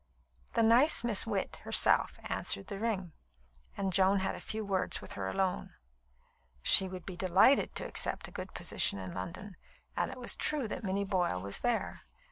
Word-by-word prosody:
The 230 - +3
nice 240 +6 +5
Miss 230 -2 +1
Witt 200 -4 -3
herself - - +3
answered 100 - 0
the 195 - -6
ring, 195 -7 -3 0.6
and 195 -2 -2
Joan 190 +2 +4
had 190 - -2
a - - -8
few 220 0 -4
words 190 -2 0
with 100 - -10
her 95 -1 -5
alone. 190 - -2 0.9
She 190 - +6
would 185 -1 -9
be 190 - -7
delighted 190 +10 +3
to - - -3
accept - - -1
a - - -14
good - - -8
position - - +1
in 95 -2 -7
London; 190 +2 -7 0.4
and - - -1
it 260 - -9
was 250 - -1
true 295 -6 -2
that - - -6
Minnie 200 0 -2
Boyle 180 - -1
was 100 +2 -2
there. 240 -2 -2
195 Hz, 180 wpm, -31 LUFS, 180-225 Hz, 0.9 s, She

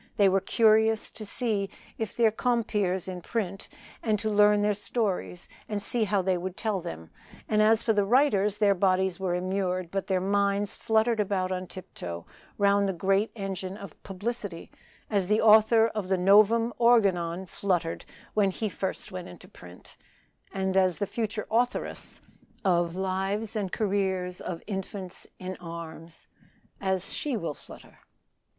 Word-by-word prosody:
They 200 -2 +5
were 195 +1 +2
curious 220 0 +3
to 220 - -9
see 210 -4 -1 0.5
their 230 -2 +4
compeers 210 -6 0
in 180 -1 -5
print, 195 -2 -4 0.3
and 215 -2 +1
to 215 +1 -2
learn 210 0 +5
their 210 0 +3
stories, 200 -4 -2 0.2
and 210 -1 -1
see 220 +3 +1
how 200 -2 +1
they 185 -1 +1
would 185 +1 -5
tell 215 -5 -1
them; 80 - -8 0.4
and 215 0 +2
as 220 +1 +4
for 225 - +2
the 205 -1 +2
writers, 210 -3 +3
their 205 -2 +4
bodies 190 -1 +1
were 185 -2 -1
immured, 185 -1 -2
but 195 0 -2
their 190 -2 +1
minds 200 +1 0
fluttered 220 +1 +1
about 190 -2 0
on 185 0 -3
tip 185 -1 -10
toe 85 -1 -6 0.3
round 200 -1 +3
the - - -1
great 195 +4 +1
engine 195 -2 -5
of 200 -2 -9
publicity, 200 -2 -5 0.4
as 200 -4 0
the 210 +2 +3
author 220 +1 +6
of 210 -4 -4
the 190 - +2
"Novum 215 +5 +5
Organon" 190 -7 +3
fluttered 175 -3 -2 0.3
when 205 -2 +3
he 215 +3 -3
first 190 0 -4
went 185 -1 -6
into 180 +1 -12
print, 90 - -14 0.5
and 190 -1 -1
as 185 -2 +3
the 205 - -1
future 215 +1 -3
authoress 245 +2 -1 0.4
of 175 -2 +2
"Lives 195 +4 -2
and 200 -4 -2
Careers 190 -3 -1
of 170 -2 -5
Infants 195 -2 -6
in 185 0 -6
Arms" 165 -1 -9 1.0
will 220 - -2
flutter. - - -15
195 Hz, 155 wpm, -27 LUFS, 185-215 Hz, 1.0 s, author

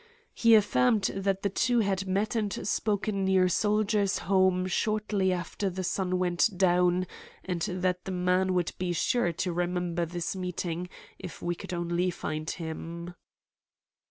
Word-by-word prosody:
He 230 -1 +5
affirmed 200 - +3
that 195 0 -1
the 200 - +2
two 240 +3 +2
had 195 -2 -1
met 200 +4 0
and 210 -3 -2
spoken 205 -2 0
near 190 -1 +4
Soldiers' 210 +1 +1
Home 185 -1 +3
shortly 210 0 0
after 185 +2 -2
the 185 +1 -4
sun 185 0 -1
went 180 +3 +2
down, 180 0 +3 0.4
and 180 -3 -3
that 180 +1 -1
the 190 - -4
man 185 +1 +1
would 175 -2 +1
be 180 -1 -1
sure 175 +2 +1
to 175 +2 -2
remember 175 -1 -1
this 175 +2 -3
meeting 180 -1 -3 0.3
if 180 - -9
we 175 - 0
could 190 +2 -8
only 175 +1 0
find 155 -2 -4
him. 170 +1 -6
185 Hz, 150 wpm, -28 LUFS, 175-195 Hz, 0.4 s, He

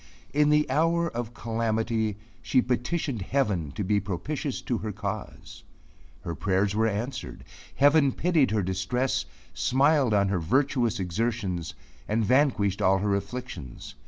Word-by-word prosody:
In 150 +1 +4
the 150 0 +3
hour 165 +4 +2
of 120 0 -5
calamity 110 -2 -1 0.2
she 130 - +2
petitioned 125 - -1
heaven 100 - 0
to 105 - -3
be 105 +2 +2
propitious 130 - -3
to 120 -3 -1
her 110 - -4
cause. 100 +1 -6 0.6
Her 85 - -3
prayers 95 +4 0
were 110 +1 +2
heard. 115 +6 -5 0.3
Heaven 145 0 +5
pitied 160 -2 +2
her 105 -2 0
distress, 95 +8 -1 0.3
smiled 135 -3 +3
on 100 -1 +3
her 95 -2 0
virtuous 120 - +1
exertions, 90 -2 -2 0.3
and 110 +1 +1
vanquished 120 -6 +2
all 95 +1 +4
her 100 +1 0
afflictions. 100 - -5
110 Hz, 135 wpm, -27 LUFS, 100-135 Hz, 0.6 s, Heaven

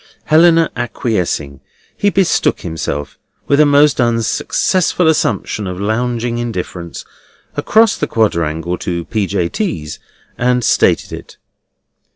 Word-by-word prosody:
Helena 165 +1 +4
acquiescing, 95 - -2 0.4
he 205 - +1
betook 195 -2 +1
himself 75 -4 -5 0.3
(with 140 - +2
a 150 - +6
most 145 -1 +4
unsuccessful 120 - +1
assumption 130 -9 0
of 90 0 -5
lounging 120 +3 -1
indifference) 90 -7 -5 0.5
across 220 0 +3
the - - -2
quadrangle 85 -5 -1
to 85 -2 -3
P. 105 -3 -1
J. 90 -3 -1
T."s, 85 - -4 0.4
and 125 0 +1
stated - - +2
it. - - -10
115 Hz, 115 wpm, -16 LUFS, 90-145 Hz, 0.5 s, a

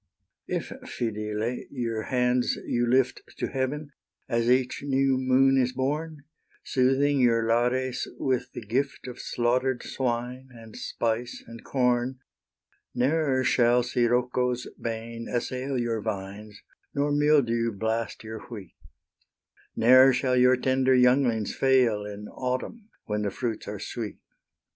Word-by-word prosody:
If, - - -3
Phidyle, 110 +1 -3
your 115 -4 -3
hands 125 -1 +1
you 120 0 0
lift 130 +1 +2 0.2
To - - -2
heaven, 145 +3 -3 0.4
as 115 0 +1
each 125 0 +2
new 135 -1 +2
moon 130 +1 +4
is 125 0 0
born, 145 +3 -3 0.4
Soothing 135 +2 +2
your 115 -2 +3
Lares 125 +2 +1
with 125 -2 -1
the - - -7
gift 135 +6 -2
Of 125 - -8
slaughter'd 125 +1 0
swine, 125 +1 -3
and 115 -2 -13
spice, 115 +1 -3
and 115 0 -11
corn, 125 0 0 0.8
Ne'er 135 0 +1
shall 120 -1 +3
Scirocco's 125 +1 0 0.2
bane 115 0 -5
assail 130 +2 -2
Your 115 -2 -1
vines, 105 0 -6 0.4
nor 145 +1 +1
mildew 140 -6 +3
blast 110 +2 -3
your 110 0 -7
wheat, 105 -7 -9 1.0
Ne'er 130 +3 +7
shall 125 0 +1
your 125 0 +5
tender 130 +1 +2
younglings 125 -3 +3
fail 125 -6 +2
In 105 0 -7
autumn, 130 - -4 0.2
when 105 0 -2
the 105 - 0
fruits 115 +2 -4
are 105 - -4
sweet. 110 0 -5
125 Hz, 125 wpm, -27 LUFS, 115-130 Hz, 1.0 s, Ne'er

